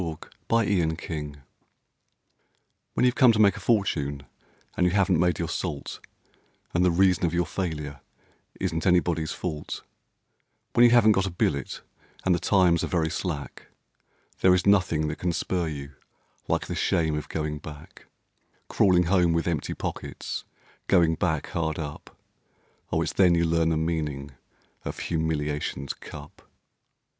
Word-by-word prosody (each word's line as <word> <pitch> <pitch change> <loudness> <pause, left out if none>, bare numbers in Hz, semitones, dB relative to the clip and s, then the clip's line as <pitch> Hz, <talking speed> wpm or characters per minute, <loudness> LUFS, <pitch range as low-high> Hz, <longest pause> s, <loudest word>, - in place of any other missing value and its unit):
The 90 - -2
Shame 80 - -3 0.7
of 80 0 -2
Going 75 -5 -5
Back - - -17 1.6
When - - +3
you've 125 - +4
come 125 -1 +6
to - - 0
make 100 -3 +5
a - - -7
fortune 75 -11 0 0.5
and 90 - +3
you 90 - 0
haven't 95 -4 +3
made 90 -2 +2
your 85 - -2
salt, 85 -4 -4 0.7
And 85 - +2
the 90 - +4
reason 90 +1 +3
of 85 - -2
your 90 0 +2
failure 75 -7 -4 0.6
isn't 85 -2 -1
anybody's 85 -3 +2
fault 75 -5 -5 0.9
When 120 - +5
you - - +7
haven't 115 -2 +6
got 95 -2 +2
a - - -2
billet, 75 -5 -2 0.4
and 95 - +4
the 85 - +1
times 90 -2 +3
are - - -1
very 80 -3 0
slack, 80 -6 -5 0.7
There 90 -1 +5
is 90 - 0
nothing 90 -6 +3
that 75 - -4
can 90 -1 -1
spur 90 0 -1
you 70 -2 -6 0.6
like - - 0
the - - -5
shame 80 -2 +1
of 75 - -5
going 75 -1 -3
back; 75 +1 -12 0.6
Crawling 90 -3 +4
home 90 -1 +3
with 85 0 0
empty 85 -3 -2
pockets, - - -5 0.4
Going 85 -4 +4
back 80 -3 -1
hard 80 -2 -2
up; 75 -2 -7 0.7
Oh! 80 - +1
it's 80 -1 -3
then 90 -1 +5
you 85 0 +2
learn 80 0 +2
the 80 - +1
meaning 75 -4 -2 0.5
of - - -5
humiliation's 75 -4 -2
cup. 75 +7 -11
85 Hz, 155 wpm, -26 LUFS, 75-90 Hz, 1.6 s, you